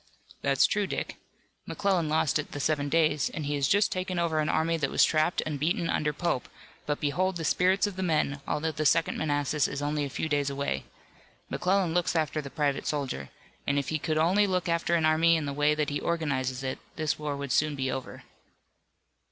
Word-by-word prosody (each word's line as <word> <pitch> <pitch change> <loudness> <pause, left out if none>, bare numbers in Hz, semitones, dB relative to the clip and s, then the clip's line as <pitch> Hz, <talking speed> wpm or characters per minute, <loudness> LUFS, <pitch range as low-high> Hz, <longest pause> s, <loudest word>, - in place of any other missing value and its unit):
"That's - - +3
true, - - 0
Dick. - - -4 0.5
McClellan 190 -6 0
lost 155 -1 +2
at 145 - -6
the 145 - -4
Seven 145 0 0
Days, 155 -3 +2
and 155 - -5
he 145 - -1
has 140 -2 +1
just 205 +1 +3
taken 185 0 -2
over 165 -2 +1
an 155 - 0
army 165 +1 +1
that 140 -4 -1
was - - +4
trapped 155 +2 +1
and 150 -2 -3
beaten 165 +3 0
under 150 0 0
Pope, 160 -3 -2 0.4
but 145 -1 -1
behold 180 +6 0
the 165 - -4
spirits 185 +5 +3
of 205 -2 -5
the - - -2
men, 155 -5 0
although 160 +2 -1
the 155 0 -3
Second 165 +3 +2
Manassas 145 -1 +1
is 140 - -4
only 145 +1 -1
a 140 - -3
few 150 - -3
days 145 -2 +1
away. 140 0 -2 0.7
McClellan 185 -2 +1
looks 175 -1 +1
after 155 -1 0
the 140 - -8
private 145 -1 -1
soldier, 135 - -3 0.4
and 140 - +1
if 140 - -1
he 155 - -1
could 155 0 -1
only 185 +6 +3
look 180 -2 0
after 170 0 +1
an 165 -2 +2
army 160 +1 +4
in 160 -2 -1
the 140 - -3
way 150 +1 +2
that 150 -1 -1
he 145 - -1
organizes 135 -6 -1
it 130 0 -3 0.2
this 155 -1 -1
war 150 -2 -3
would 140 -2 -5
soon 150 +2 +2
be 130 -1 -1
over." 130 0 -6
155 Hz, 215 wpm, -28 LUFS, 145-165 Hz, 0.7 s, was